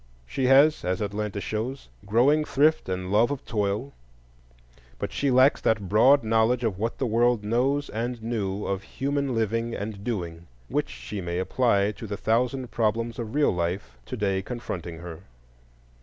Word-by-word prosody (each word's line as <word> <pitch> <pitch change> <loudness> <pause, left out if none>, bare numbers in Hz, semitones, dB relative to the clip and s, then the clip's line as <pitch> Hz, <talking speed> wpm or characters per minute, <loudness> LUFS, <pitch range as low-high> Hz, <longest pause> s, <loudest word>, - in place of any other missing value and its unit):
She 130 - -1
has, 140 +4 +5
as 90 0 -1
Atlanta 105 0 -3
shows, 115 +7 -4 0.2
growing 135 +9 +4
thrift 150 -4 +2
and 95 0 -3
love 110 +3 +4
of 145 -1 -4
toil; 105 +5 -2 1.0
but - - -4
she 140 - 0
lacks 130 +2 +5
that 110 -3 +1
broad 125 +8 +5
knowledge 115 +2 +2
of 105 -5 -1
what 115 +2 -2
the 135 - -1
world 120 -1 +2
knows 130 +7 +1
and 120 +3 -3
knew 105 -4 -2
of 100 -1 -2
human 140 +2 -2
living 115 +1 -1
and 100 -1 -5
doing, 85 -7 -4 0.2
which - - -1
she 105 -2 -6
may 85 0 -3
apply 100 +1 +2
to 105 +2 -9
the 100 0 -4
thousand 125 +4 0
problems 115 +1 -1
of 115 +2 -5
real 150 -1 +4
life 85 -7 -3
to - - -5
day 95 -2 0
confronting 95 -7 -6
her. 85 -1 -8
110 Hz, 165 wpm, -26 LUFS, 100-125 Hz, 1.0 s, has